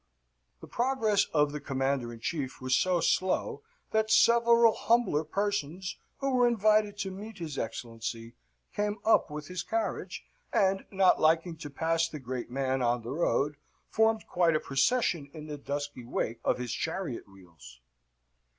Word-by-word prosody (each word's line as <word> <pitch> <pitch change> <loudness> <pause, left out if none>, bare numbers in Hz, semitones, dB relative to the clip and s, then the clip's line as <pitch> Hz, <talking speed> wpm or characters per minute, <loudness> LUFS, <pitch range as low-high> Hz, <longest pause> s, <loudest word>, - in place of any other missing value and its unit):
The - - -10
progress 235 -5 +1
of 150 -2 +1
the 150 - -4
Commander 135 -3 -1
in 115 -1 -11
Chief 140 -4 -3
was 130 0 -1
so 180 -2 +2
slow, 425 - 0 0.3
that 220 0 +1
several 235 0 +5
humbler 225 -10 +2
persons 190 0 -2 0.2
who 275 -1 -1
were 245 -1 +4
invited 215 -2 +2
to 195 -2 -3
meet 205 +3 -9
his 160 -5 -5
Excellency 115 0 -5 0.4
came 210 0 -1
up 225 - +4
with 150 0 -6
his 180 -1 -4
carriage, 225 +3 -3 0.3
and, 195 -1 +2
not 190 -2 +4
liking 165 +2 +3
to 150 -2 -7
pass 165 +3 0
the 155 - -7
great 125 -2 -5
man 130 0 -1
on 120 -1 +1
the 120 - -6
road, 150 -1 0 0.3
formed 220 0 +2
quite 170 -3 +2
a - - +3
procession 145 - +1
in 155 -1 -8
the 150 -1 -7
dusty 140 -2 -4
wake 115 -1 -3
of - - +1
his 125 -1 -4
chariot 160 - -4
wheels. 85 -10 -16
165 Hz, 160 wpm, -29 LUFS, 135-210 Hz, 0.4 s, several